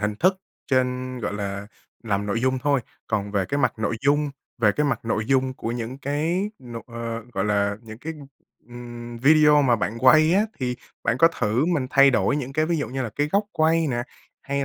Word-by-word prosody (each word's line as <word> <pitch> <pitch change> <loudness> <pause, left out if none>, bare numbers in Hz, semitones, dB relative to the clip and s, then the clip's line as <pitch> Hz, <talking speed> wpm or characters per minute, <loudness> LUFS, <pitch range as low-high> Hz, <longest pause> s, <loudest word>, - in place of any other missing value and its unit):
hình 105 0 -1
thức 185 - +2 0.3
trên, 130 -1 0
gọi 110 - -2
là, 100 -1 -4 0.4
làm 105 -3 -1
nội 105 +3 -1
dung 130 +1 +1
thôi. 140 0 +1 0.3
Còn 105 -2 -2
về 100 -2 0
cái 140 - -1
mặt 135 - +2
nội 110 +1 -1
dung 145 0 +2 0.3
về 110 -3 +4
cái 150 - 0
mặt 125 -5 -1
nội 110 -1 -1
dung 130 0 +2
của 115 - -4
những 120 +2 -5
cái 160 +8 -1
n 120 - -10
ờ, 115 -1 -5
gọi - - -1
là, 100 -1 +1
những 110 -1 -10
cái, 160 +5 -5 0.6
ừm, 120 -1 -8
video 150 +2 +5
mà 125 -3 +3
bạn 110 +1 -3
quay 155 +6 +6
á, 200 - +4 0.2
thì 125 -2 -2 0.3
bạn 115 - +1
có 165 - +7
thử 120 -4 0
mình 155 -7 0
thay 140 0 +6
đổi 120 +3 +2
những 135 -2 -4
cái 155 +2 +1
ví 170 0 0
dụ 145 - -2
như 130 +2 -3
là 120 - -4
cái 145 +1 +1
góc 200 +2 +3
quay 160 +1 +2
nè, 120 -3 -1 0.4
hay 140 0 -2
130 Hz, 215 wpm, -24 LUFS, 115-145 Hz, 0.6 s, có